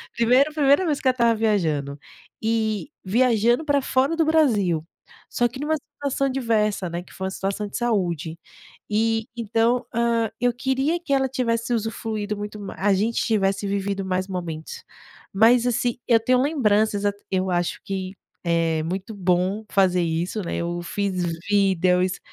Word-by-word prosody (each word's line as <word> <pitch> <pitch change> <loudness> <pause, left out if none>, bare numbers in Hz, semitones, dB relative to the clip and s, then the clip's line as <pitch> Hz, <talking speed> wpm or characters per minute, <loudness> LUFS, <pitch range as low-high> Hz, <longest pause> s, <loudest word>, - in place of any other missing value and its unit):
Primeiro 255 +6 +3
primeira 290 +4 +3
vez 300 -3 0
que 265 - -1
ela 255 - +5
estava 235 -2 +3
viajando, 160 -11 0 0.4
e 220 +2 -1
viajando 240 +5 +2
pra 285 -2 +2
fora 265 +5 +1
do 325 - +3
Brasil, 210 - +2 0.4
só 240 - +1
que 245 +3 -10
numa 305 +2 0
situação 275 -1 -3
adversa, 220 -7 0
né, 170 +1 -4
que - - -18
foi 190 - -4
a 190 - -4
situação 200 +2 -3
de - - -5
saúde. 175 - -1 0.5
E, 225 +1 +1
então, 230 +2 +1
hã, 235 -1 +1
eu 245 0 +2
queria 265 +7 0
que 280 -5 -2
ela 265 -1 +2
tivesse 235 -2 -1
usufruído 215 -1 -3
muito 210 0 -6
mai 200 - -7
a 200 +1 +3
gente 220 +4 0
tivesse 200 -2 +1
vivido 200 0 -2
mais 185 0 -1
momentos. 170 -4 -6 0.5
Mas 230 +4 +5
assim, 240 0 0
eu 230 -2 +5
tenho 250 +3 +2
lembranças, 215 -8 +1
eu 205 - +3 0.2
eu 185 0 0
acho 175 -1 -1
que 195 -2 -4 0.3
é 165 -2 +1
muito 190 +6 -4
bom 185 +3 0
fazer 185 -2 +3
isso, 170 +6 -2
né, - - -3
eu 175 0 -3
fiz 185 0 -2 0.3
vídeos, 185 -2 +2
215 Hz, 160 wpm, -23 LUFS, 185-245 Hz, 0.5 s, ela